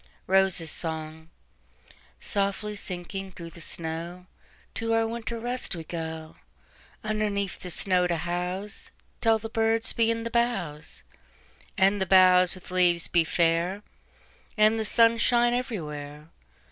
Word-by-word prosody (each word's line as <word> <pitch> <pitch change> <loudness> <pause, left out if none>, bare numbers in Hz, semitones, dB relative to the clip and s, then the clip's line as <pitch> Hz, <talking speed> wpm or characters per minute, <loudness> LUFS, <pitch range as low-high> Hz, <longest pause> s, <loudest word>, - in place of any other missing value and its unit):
ROSES' 190 -4 +3
SONG"SOFTLY 160 - -5
sinking 190 0 -5
through 170 -2 -9
the 170 - -10
snow, 170 +3 -4 0.5
To 225 0 -1
our 225 0 +2
winter 230 0 -4
rest 245 -3 -2
we 165 - -6
go, 160 -1 -6 0.7
Underneath 210 -2 -1
the 180 - -7
snow 180 0 +2
to 175 - 0
houseTill 185 +6 -2
the 225 - -6
birds 225 0 +1
be 230 -1 +2
in 230 0 -1
the 230 - -4
boughs, 195 -11 -2 0.7
And 195 +1 +3
the 190 - +1
boughs 185 -1 +6
with 185 -1 -13
leaves 175 -2 +2
be 170 -1 +3
fair, 170 +4 +1 0.7
And 215 +1 +4
the 220 - -1
sun 230 +2 +4
shine 240 0 +3
everywhere. 150 - -5
185 Hz, 125 wpm, -27 LUFS, 165-220 Hz, 0.7 s, boughs